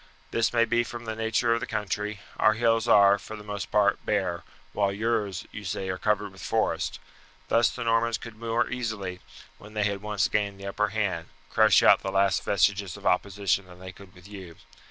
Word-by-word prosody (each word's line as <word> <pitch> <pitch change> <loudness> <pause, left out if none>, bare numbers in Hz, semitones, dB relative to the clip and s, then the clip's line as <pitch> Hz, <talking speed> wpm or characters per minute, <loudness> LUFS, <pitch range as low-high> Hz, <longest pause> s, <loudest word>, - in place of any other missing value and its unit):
This 115 -1 +1
may 115 -1 +3
be 120 +1 +1
from 120 0 -8
the 110 - -3
nature 115 +1 +1
of 115 - 0
the - - -5
country; 105 -1 -3 0.2
our 110 - +4
hills 115 0 +1
are, 100 -2 +6
for 110 - -9
the 105 - -10
most 105 -2 -5
part, 105 -1 +2
bare, 95 -5 -1 0.3
while 100 -1 +1
yours, 105 -2 -1
you 105 - -8
say, 95 0 -3
are 95 0 -3
covered - - 0
with - - -14
forest. - - -1 0.5
Thus 115 0 +4
the 125 - -5
Normans 115 0 +1
could 115 -2 -10
more 115 +1 -1
easily, 110 -7 -4 0.4
when 105 +1 -14
they 105 - +1
had 100 -1 -1
once 105 -2 0
gained 100 -2 -1
the 100 - -9
upper 105 +2 0
hand, 95 -6 -2 0.2
crush - - +5
out - - +7
the 95 - -3
last 95 0 +2
vestiges 100 -1 +1
of - - -14
opposition 100 0 +1
than 90 -1 -14
they 95 +1 -9
could 95 +1 -16
with 90 0 -15
you. 95 -5 -10
105 Hz, 205 wpm, -27 LUFS, 95-115 Hz, 0.5 s, out